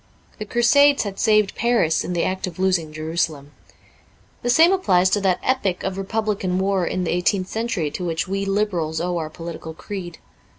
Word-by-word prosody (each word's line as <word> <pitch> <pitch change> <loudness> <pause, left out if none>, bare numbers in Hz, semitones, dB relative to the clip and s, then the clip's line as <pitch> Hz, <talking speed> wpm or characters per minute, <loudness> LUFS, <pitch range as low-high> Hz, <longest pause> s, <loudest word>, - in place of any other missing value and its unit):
The 215 - -4
Crusades 275 +6 +4
had 200 -2 -6
saved 215 -3 +3
Paris 230 -9 +1
in 180 - -4
the 170 - 0
act 185 0 -2
of 180 - -8
losing 185 -4 0
Jerusalem. 155 -2 -3 0.9
The 245 - -2
same 325 +8 +6
applies 185 - +3
to 205 - +2
that 185 -2 +2
epic 200 -8 0
of 190 -1 -2
Re 195 - -4
publican 205 -3 -1
war 190 -2 0
in 185 - -2
the 170 - -1
eighteenth 185 +2 0
century 220 -9 -2
to 180 - -5
which 165 -1 -2
we 195 +1 -2
Liberals 195 -6 -1
owe 175 0 -1
our 155 -1 -4
political 165 -1 -8
creed. 175 -3 -7
185 Hz, 185 wpm, -22 LUFS, 170-210 Hz, 0.9 s, same